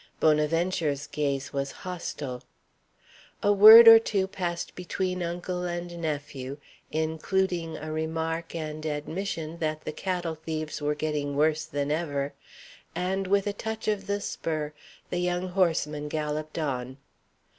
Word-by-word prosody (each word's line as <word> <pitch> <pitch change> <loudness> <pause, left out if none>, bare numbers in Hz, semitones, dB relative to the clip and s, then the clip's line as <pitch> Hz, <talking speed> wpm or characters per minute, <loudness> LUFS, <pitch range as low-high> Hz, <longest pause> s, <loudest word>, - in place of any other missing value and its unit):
Bonaventure's 155 -1 +1
gaze 140 -2 -2
was 140 0 -2
hostile. 145 -8 -5 1.0
A 205 - +5
word 220 +3 +11
or 225 0 +12
two 200 -4 0
passed 175 -3 -4
between 180 0 -3
uncle 175 +1 -3
and 175 0 -4
nephew, 145 -3 -4 0.3
including 165 +2 -1
a 155 +1 -6
remark 160 +1 -3
and 155 -1 -5
admission 160 +2 -4
that 155 -1 -2
the - - -2
cattle 175 -1 -2
thieves 155 -1 -5
were 150 0 0
getting 150 -2 -2
worse 155 +1 +2
than 145 0 -2
ever; 145 -3 -1 0.6
and 190 +1 -1
with 200 +1 +2
a 205 - -1
touch 220 +1 -5
of 205 -2 -1
the 205 0 0
spur, 155 -6 -3 0.4
the 180 - 0
young 180 +1 -1
horseman 160 -5 0
galloped 155 +1 -3
on. 130 -4 -3
160 Hz, 135 wpm, -27 LUFS, 150-180 Hz, 1.0 s, or